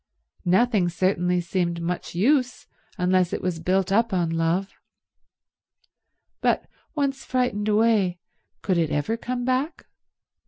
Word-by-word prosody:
Nothing 195 -1 +3
certainly 180 0 +1
seemed 170 -1 -1
much 170 0 -4
use 250 - +1 0.3
unless 180 0 +2
it - - -1
was 180 -2 -1
built 185 +3 0
up 225 +3 +2
on 175 -3 +1
love. 165 +4 0 1.7
But - - +1 0.3
once 275 -2 -1
frightened 245 -5 -1
away, 210 -4 +3 0.5
could 185 -4 +1
it 160 -2 +1
ever 150 +11 -1
come 245 +1 -4
back? 260 +6 -1
190 Hz, 120 wpm, -24 LUFS, 175-235 Hz, 1.7 s, Nothing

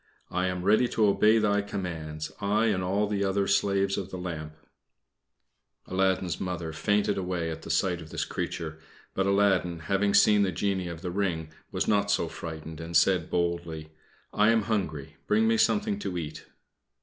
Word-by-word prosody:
I 90 +1 0
am 90 -1 -3
ready 110 +5 +4
to 110 -2 +2
obey 105 +2 +4
thy 105 -2 +2
commands, 80 -6 -5
I 105 +2 +2
and 90 -1 -2
all 100 +3 +1
the 100 -1 -1
other 100 0 +1
slaves 100 0 +1
of 95 -1 -6
the 95 - -6
lamp." 80 -4 -6 1.3
Aladdin's 95 -2 0
Mother 85 -3 -3
fainted 105 +5 +1
away 90 -3 -2
at 80 - -6
the - - -10
sight 90 -3 +1
of 80 - -11
this - - -2
creature; 80 -2 -4 0.3
but 95 0 0
Aladdin, 100 -3 +2
having 100 +5 0
seen 105 -1 +6
the 95 -2 +2
genie 95 +1 -1
of 85 0 -7
the 90 - -3
ring, 85 -5 -1 0.2
was - - -1
not 100 -1 +2
so 100 -4 +1
frightened, 80 -1 -7
and 85 0 +1
said 90 -1 +3
boldly: 85 -3 -2 0.4
"I 105 +1 +4
am 115 -1 +3
hungry, 90 -11 -3
bring 110 +1 +3
me 115 0 +3
something 210 - +2
to 90 - -4
eat." 75 -3 -6
95 Hz, 175 wpm, -28 LUFS, 85-100 Hz, 1.3 s, seen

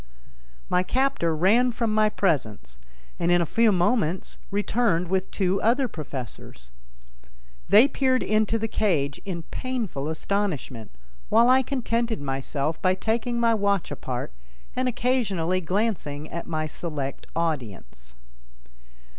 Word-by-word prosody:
My 180 - +2
captor 250 -6 +1
ran 220 +10 +4
from 230 -2 -1
my 215 0 +4
presence 110 - -1 0.4
and, 170 - +2
in 175 - +5
a 170 - +2
few 225 +6 +3
moments, 180 -2 0
returned 200 -4 +1
with 190 0 0
two 190 -1 0
other 250 +4 +2
professors. 130 - -8 1.0
They 220 +7 +8
peered 260 -3 +1
into 215 +1 +1
the 225 0 -2
cage 160 -11 0
in 175 -4 -4
painful 230 - -3
astonishment, 160 - -2 0.4
while 240 +2 +5
I 260 +1 +6
contented 235 -4 -1
myself 140 +2 -3
by 185 0 +3
taking 235 +4 -1
my 230 -1 +3
watch 200 -5 0
apart 125 - -4 0.4
and 255 0 0
occasionally 205 -8 0
glancing 180 -6 -2
at 170 - -5
my 155 -2 -2
select 150 -3 -5
audience. 105 - -4
185 Hz, 125 wpm, -25 LUFS, 155-230 Hz, 1.0 s, They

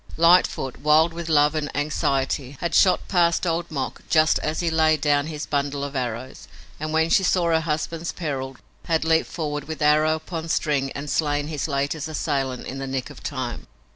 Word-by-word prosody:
Lightfoot, 165 -6 +3
wild 155 +3 +4
with 170 0 -6
love 150 -1 +4
and 155 -2 -2
anxiety, 140 -2 -1
had 170 -1 -2
shot 185 -2 +4
past 170 -1 +2
Old 170 0 -1
Mok 135 -4 -4
just 155 -1 +4
as 155 +1 -2
he 170 -2 0
laid 160 -1 +3
down 145 0 +2
his 155 -2 -5
bundle 140 -1 -1
of 140 0 -5
arrows, 125 0 -4 0.3
and, 155 +1 -3
when 160 +1 +1
she - - +5
saw 180 -1 +2
her 160 - +4
husband's 165 +1 -3
peril, 135 -6 -4 0.3
had 160 -1 0
leaped 160 0 +2
forward 150 -3 -4
with 160 -2 -6
arrow 155 +1 +3
upon 165 0 -6
string 140 -4 0
and 140 +1 -6
slain 145 -1 0
his 150 -2 -3
latest 145 +2 -2
assailant 135 -4 -2
in 135 - -6
the 135 - -4
nick 130 -1 -3
of - - -13
time. - - -5
155 Hz, 190 wpm, -23 LUFS, 140-160 Hz, 0.3 s, she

